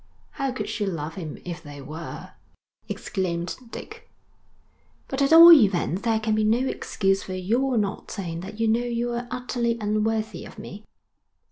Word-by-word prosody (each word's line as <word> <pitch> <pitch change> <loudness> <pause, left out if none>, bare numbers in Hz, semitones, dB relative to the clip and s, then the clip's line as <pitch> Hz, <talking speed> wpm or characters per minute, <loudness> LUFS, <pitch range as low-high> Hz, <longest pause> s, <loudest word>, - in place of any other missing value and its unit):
'How 275 -2 -2
could 255 - -4
she 205 -3 -2
love 160 -4 -4
him 160 -5 -6
if 175 -1 -6
they 145 -3 -10
were!' 155 +5 -8 0.6
exclaimed 175 -3 -3
Dick. - - -10 1.0
'But 265 +1 -3
at 275 - +3
all 335 +1 +11
events 195 - +5
there 225 -1 +1
can 220 0 0
be 215 0 +2
no 235 +5 +2
excuse 195 -5 0
for 185 - -6
your 235 +8 0
not 205 -1 -2
saying 170 -4 -5
that 200 +5 -8
you 225 - +2
know 225 +2 +3
you 240 0 -2
are 240 +1 -3
utterly 245 -2 -1
unworthy 215 -2 -1
of - - -12
me.' 205 +4 -9
215 Hz, 165 wpm, -25 LUFS, 185-240 Hz, 1.0 s, all